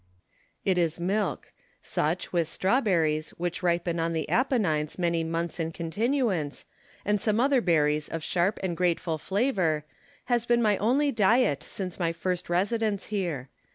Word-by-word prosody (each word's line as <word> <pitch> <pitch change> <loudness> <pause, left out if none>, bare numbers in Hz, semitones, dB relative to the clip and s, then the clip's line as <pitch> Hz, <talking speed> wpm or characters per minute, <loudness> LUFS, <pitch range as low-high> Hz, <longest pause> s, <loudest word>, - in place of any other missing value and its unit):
It 185 -2 +2
is 165 -1 0
milk: 195 +3 -1 0.3
such, 160 +5 -2
with 170 -2 +2
strawberries, 170 - +1
which 175 0 -3
ripen 170 -1 0
on 165 0 0
the 160 -1 -2
Apennines 195 - +1
many 170 -2 +1
months 165 +1 -3
in 165 0 -1
continuance, 195 - -1 0.4
and 205 -1 +1
some 215 0 +1
other 270 0 +3
berries 150 -5 +2
of 165 -1 -4
sharp 180 +5 +1
and 180 -3 -1
grateful 170 -2 0
flavour, 190 - 0 0.4
has 240 -2 0
been 240 0 +4
my 215 -3 +3
only 275 +7 +2
diet 220 - +3
since 185 -2 -6
my 165 -2 0
first 180 +1 -3
residence 205 +3 0
here. 165 -10 -2
180 Hz, 150 wpm, -27 LUFS, 165-215 Hz, 0.4 s, been